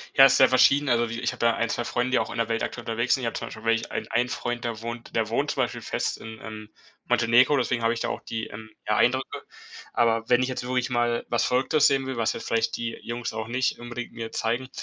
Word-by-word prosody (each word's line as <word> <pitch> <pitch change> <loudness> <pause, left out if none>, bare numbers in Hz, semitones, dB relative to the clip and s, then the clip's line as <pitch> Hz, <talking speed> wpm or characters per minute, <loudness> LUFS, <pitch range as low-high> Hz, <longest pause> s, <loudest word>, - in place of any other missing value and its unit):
Ja, 135 - +9
ist - - +3
sehr 130 - +7
verschieden. 140 +3 +4
Also 120 -1 +2
wie 115 +1 -4
ich 120 - -1
hab - - -10
ja 115 -1 +3
1, 115 -1 -1
2 120 - -2
Freunde, 125 +1 -1
die - - +3
auch - - -2
in - - -6
der 115 -1 +1
Welt 115 0 -1
aktuell 120 - -4
unterwegs 115 +2 +1
sind. 130 - -5
Ich - - 0
hab, - - -3
zum - - -4
Beispiel, 110 - -10
welche 115 0 +1
ein - - -4
einen 120 +2 +1
Freund, 120 0 -3
der 115 -2 -3
wohnt 115 0 -7
der 110 -1 +1
wohnt, 115 - 0
zum - - +1
Beispiel, - - -4
fest - - -2
in, 110 0 -9
ähm, 110 -1 -8 0.4
Montenegro, 120 +4 +4
deswegen 125 -2 0
hab 115 - +3
ich 115 - -2
da - - -1
auch - - -4
die, 110 -1 -4
ähm, 110 +1 -10 0.2
ja, 105 - +2
Eindrücke. 130 +2 +1 0.5
Aber 115 -1 +1
wenn 125 0 +5
ich - - 0
jetzt 130 - -3
wirklich 125 0 0
mal 120 -1 0
was 120 - +1
Verrücktes 135 +4 +3
sehen 135 -1 +1
will, 130 -1 -4
was 115 -1 +1
jetzt - - -7
vielleicht 115 0 0
die 115 -1 -3
Jungs 120 -1 -4
auch 110 0 -4
nicht 125 +1 -1
unbedingt 120 0 -7
mir 115 -1 -6
zeigen, 120 +3 -2
120 Hz, 270 wpm, -26 LUFS, 115-125 Hz, 0.5 s, Ja